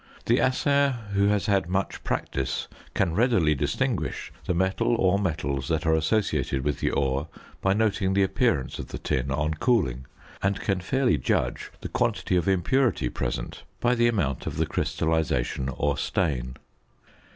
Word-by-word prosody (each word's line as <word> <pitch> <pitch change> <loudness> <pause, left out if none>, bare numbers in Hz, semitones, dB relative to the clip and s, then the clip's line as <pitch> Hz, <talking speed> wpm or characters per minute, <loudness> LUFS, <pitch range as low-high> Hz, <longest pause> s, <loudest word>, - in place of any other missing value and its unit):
The 120 +2 +3
assayer 140 +1 +2 0.2
who 100 0 +3
has 105 -1 +1
had 100 -4 +1
much 95 +1 -2
practice 65 -1 -2 0.3
can 90 -4 +1
readily 105 -7 +3
distinguish 70 - -2
the 90 - 0
metal 95 +6 +1
or 95 -3 +3
metals 70 -8 -2
that 80 +1 0
are 80 - +3
associated 80 -5 +1
with 75 +1 -1
the - - +1
ore 70 +2 0 0.3
by 95 - +3
noting 100 -2 +1
the 100 - +4
appearance 95 - 0
of - - -5
the - - -6
tin 65 +1 -1
on 75 +3 0
cooling; 75 - +1 0.3
and 95 0 0
can 95 -3 0
fairly 130 +7 +1
judge - - -1
the - - -4
quantity - - 0
of 90 -1 +1
impurity 95 - +2
present - - -4 0.2
by 120 +1 +2
the 120 -1 +3
amount 85 - -1
of - - -4
the - - +2
crystallisation 75 -5 -1
or 70 +2 0
stain. 65 -9 -1
90 Hz, 160 wpm, -26 LUFS, 70-105 Hz, 0.3 s, the